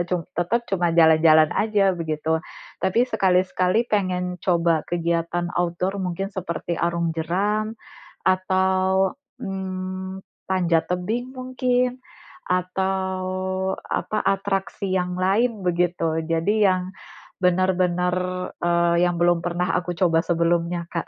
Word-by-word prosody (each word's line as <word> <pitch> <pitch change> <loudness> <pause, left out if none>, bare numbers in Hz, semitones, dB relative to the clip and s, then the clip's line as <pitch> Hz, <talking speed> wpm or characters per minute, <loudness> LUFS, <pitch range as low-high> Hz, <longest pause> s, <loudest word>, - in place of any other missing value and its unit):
cum 175 -3 -1
tetap 205 +8 0
cuma 175 -3 +1
jalan-jalan 160 -1 +6
saja, 205 -3 +2
begitu. 160 -2 -1 0.4
Tapi, 225 +6 +2
sekali-sekali 185 +3 +2
pengen 180 -3 -1
coba 170 -3 +2
kegiatan 170 0 -1
outdoor 175 +3 -1
mungkin 190 +2 -3
seperti 170 -3 -4
arum 170 -1 0
jeram, 205 +7 -1 0.5
atau 190 0 +2 0.3
mmm, 190 -2 -5 0.3
panjat 175 -3 +1
tebing 220 +8 -2
mungkin, 255 0 0 0.4
atau 190 +1 -1 0.7
apa, 215 - -2
atraksi 195 0 -1
yang 180 0 -2
lain, 205 +5 +1
begitu. 175 -2 0
Jadi, 200 +6 +2
yang 185 0 0 0.5
benar-benar 180 -1 +2 0.4
eee, 170 0 +2
yang 175 - 0
belum 175 0 +4
pernah 175 +1 0
aku 180 0 -3
coba 165 -2 +3
sebelumnya 170 0 0
Kak. 170 - -3
180 Hz, 110 wpm, -23 LUFS, 170-190 Hz, 0.7 s, jalan-jalan